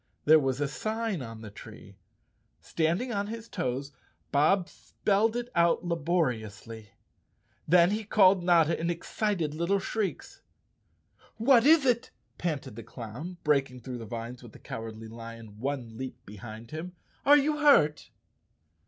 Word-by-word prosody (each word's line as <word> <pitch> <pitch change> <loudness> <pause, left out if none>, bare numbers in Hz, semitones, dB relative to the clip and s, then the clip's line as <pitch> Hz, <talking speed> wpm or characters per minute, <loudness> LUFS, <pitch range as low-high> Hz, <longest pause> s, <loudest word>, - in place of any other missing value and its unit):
There 155 +1 +7
was 135 -2 -1
a 145 - +1
sign 215 +3 -3
on 115 -2 -8
the 110 -2 -9
tree. - - -12 0.6
Standing 170 +10 -1
on 200 0 -1
his 225 +1 -7
toes 135 - -3 0.4
Bob 170 +6 +3
spelled 215 +4 0
it 240 0 -3
out 170 +1 +2
laboriously. 120 - -2 0.7
Then 175 +2 +5
he 215 +1 -1
called 195 -3 +4
Notta 170 -2 +4
in 170 - -1
excited 175 -1 -2
little 170 +5 +1
shrieks. 200 +1 -4 1.0
"What 240 +2 +5
is 315 -2 +6
it?" 240 -2 +1 0.3
panted 155 -10 -3
the - - -5
clown, 125 - -8
breaking 135 -4 +1
through 125 -1 -6
the 115 - -7
vines 115 +3 -6
with 120 -3 -13
the - - -12
Cowardly 115 0 -7
Lion 115 -2 -10
one 125 -3 -4
leap 130 0 -5
behind 110 +2 -10
him. 165 +3 -6 0.3
"Are 290 +1 +7
you 300 +1 +1
hurt?" 275 - +4
155 Hz, 145 wpm, -28 LUFS, 120-200 Hz, 1.0 s, There